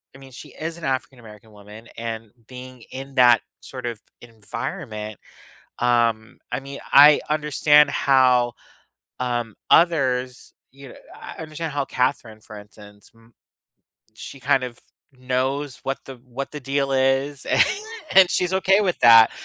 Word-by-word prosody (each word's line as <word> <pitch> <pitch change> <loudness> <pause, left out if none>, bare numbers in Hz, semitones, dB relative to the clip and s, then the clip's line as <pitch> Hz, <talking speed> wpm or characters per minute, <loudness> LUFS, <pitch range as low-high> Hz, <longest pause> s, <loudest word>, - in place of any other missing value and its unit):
I 135 - -14
mean, 135 -1 -14
she 125 - -12
is 165 +1 -7
an 170 - -8
African-American 115 -5 -6
woman 105 +2 -14
and 115 -1 -6 0.2
being 130 -1 -11
in 135 +1 -9
that 120 -3 +5 0.2
sort 130 -2 -9
of 115 -3 -5 0.2
environment, 115 - -7 0.6
um, 120 -1 0
I - - -2
mean, 140 0 -9
I 145 +1 +8
understand 150 0 +3
how, 130 -3 +3 0.7
um, 120 -3 -3 0.2
others, 130 -7 +1 0.2
you 135 0 -14
kn - - -15 0.2
I - - -11
understand 160 0 -6
how 145 -1 -2
Katherine, 125 -4 -2
for 105 0 -12
instance, 105 0 -16
mm 115 0 -23 0.9
she 135 +4 -10
kind 135 -1 +1
of 120 -2 -9 0.4
knows 130 +2 -3
what 135 0 -3
the 135 - -9
what 130 +3 -6
the 150 - -7
deal 135 +1 -2
is, 135 +1 0
a - - +1 0.5
and 190 -1 +7
she's 180 0 0
okay 190 +1 +3
with 185 -4 -1
that, 115 -1 +7
130 Hz, 145 wpm, -22 LUFS, 115-140 Hz, 0.9 s, I